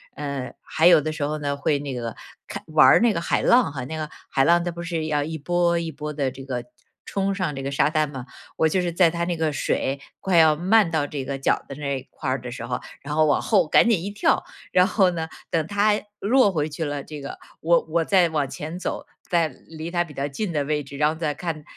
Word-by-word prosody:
呃， 140 -3 -4
还 160 - 0
有 175 - +8
的 155 +2 -2
时 155 -2 -4
候 155 +1 -1
呢， 145 -1 -2
会 145 0 +1
那 140 -2 -5
个 115 -2 -4 0.3
看 - - -6
玩 155 -1 +5
儿 - - +7
那 235 -2 +3
个 170 - -2
海 - - 0
浪 240 - +4
哈， 130 -3 -5
那 160 - -5
个 155 -1 -4 0.2
海 135 - +2
浪 170 +3 +4
它 175 - -2
不 170 0 -6
是 165 -2 -2
要 150 -2 +1
一 160 +1 -4
波 170 +2 +1
一 165 -1 -4
波 150 +1 -5
地 140 -3 0
这 135 +1 -10
个 125 -3 -4 0.4
冲 195 0 -1
上 185 -7 -2
这 135 - -5
个 135 - -3
沙 140 - +2
滩 155 -1 +1
嘛， 130 -3 -7 0.3
我 160 - +4
就 185 +4 +1
是 175 - -1
在 170 0 +4
它 170 +1 -3
那 170 -1 -1
个 160 -2 0
水 140 -1 -1 0.2
快 185 -3 +1
要 160 -2 +6
漫 190 +2 +3
到 155 -3 0
这 140 -2 -4
个 135 +1 -4
脚 135 - +1
的 - - -5
那 140 -1 -2
一 - - -15
块 135 - -5
儿 130 -1 -1
的 125 0 -7
时 125 - -6
候， - - -3 0.2
然 145 +1 -5
后 155 0 +4
往 150 - +2
后 195 -6 +3
赶 235 - +5
紧 215 -7 +3
一 200 - -4
跳。 205 - +1 0.3
然 180 0 +6
后 195 -2 +3
呢， 160 -1 -4 0.2
等 160 -2 0
它 205 +1 +2 0.3
弱 235 0 +4
回 155 -4 -1
去 155 +2 -5
了， 145 -2 -3
这 150 -2 -8
个 140 - -7 0.2
我 170 +1 +4
我 165 +1 +1
再 185 -3 +4
往 150 -3 0
前 160 +3 -6
走。 - - -4 0.2
在 170 -2 +3 0.2
离 160 0 -7
它 175 -1 +1
比 165 -3 -12
较 140 0 -2
近 175 +8 -3
的 150 -3 0
位 150 0 -1
置， 140 +1 -10
然 150 +1 +3
后 155 - 0
再 160 -2 -2
看 160 -2 -4
155 Hz, 280 characters per minute, -24 LUFS, 145-175 Hz, 0.4 s, 有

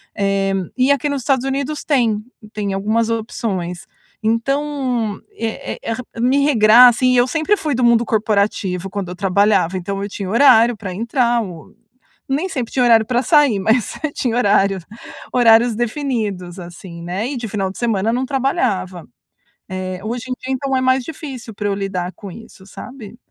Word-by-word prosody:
Eh, 195 -1 0 0.2
e 255 +2 +3
aqui 280 +1 +1
nos 280 -2 -2
Estados 265 -2 +1
Unidos 280 +2 -2
tem, 230 -7 +1 0.3
tem 200 -2 -2
algumas 220 +4 0
opções. 195 -6 -3 0.3
Então, 245 -1 -1 0.2
eh 225 -1 -4
eh 230 - -3
ra 250 +2 -6 0.2
me 270 +3 +3
regrar, 240 -2 +7
assim, 255 +2 +2
e 250 - +3
eu 245 - +5
sempre 320 +9 +1
fui 300 -3 -2
do 250 0 +1
mundo 235 0 +4
corporativo 200 -4 0
quando 195 -2 -4
eu 180 - -6
trabalhava, 195 -1 +2
então, 195 +2 -4
eu 205 - -4
tinha 195 -2 -5
horário 235 -1 +5
pra 195 -3 -6
entrar 235 +3 +1
ou 190 -1 -9 0.6
nem 310 +8 -1
sempre 255 -8 -4
tinha 255 - +2
horário 225 -2 +5
pra 245 +2 0
sair, 290 - +4
mas 225 +4 +3
você 310 -3 -5
tinha 240 -5 -2
horário, 200 -3 +2 0.5
horários 235 -1 +5
definidos, 215 - -3
assim, 175 0 -10
né? 190 +8 -3
E 275 - -4
de 235 - -4
final 195 -2 -2
de - - -13
semana 225 -2 0
não 255 +2 -1
trabalhava. 250 - -1 0.6
Eh, 185 0 -4
hoje 235 +3 -4
em - - -1
dia, 260 +1 -3
então, 265 0 -1
é - - 0
mais 260 0 +2
difícil 270 -6 -8
pra 205 0 -3
eu 200 - 0
lidar 190 -2 -3
com 200 -3 -10
isso, 205 -2 -13
sabe? 235 0 -10
225 Hz, 180 wpm, -19 LUFS, 195-255 Hz, 0.6 s, regrar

